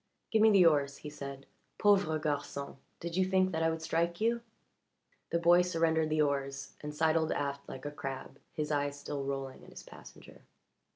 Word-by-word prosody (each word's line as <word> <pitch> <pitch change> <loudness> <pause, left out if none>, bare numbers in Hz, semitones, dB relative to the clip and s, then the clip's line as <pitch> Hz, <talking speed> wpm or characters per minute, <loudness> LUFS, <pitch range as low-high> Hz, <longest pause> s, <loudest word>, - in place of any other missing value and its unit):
"Give 220 - +3
me 220 - +7
the 195 -4 +6
oars," 145 -3 +3
he 150 - -8
said. 140 -2 -8 0.3
"Pauvre 195 -7 +3
garçon 145 -2 -3 0.2
did 170 0 -5
you 190 - +3
think 185 0 +2
that 160 -2 -1
I 165 - +3
would 160 0 -3
strike 170 +2 0
you?" 235 +2 +1 0.9
The - - +1
boy 170 +1 +6
surrendered 165 -3 +1
the 155 0 +3
oars 140 -1 -2
and 150 - -5
sidled 160 +1 +2
aft 140 0 -3
like 130 +1 -8
a 145 - -3
crab, 135 -1 -6
his 150 -1 -3
eyes 145 -1 -1
still 145 -1 -4
rolling 135 -1 -4
at - - -14
his - - -11
passenger. - - -14
155 Hz, 185 wpm, -32 LUFS, 140-170 Hz, 0.9 s, me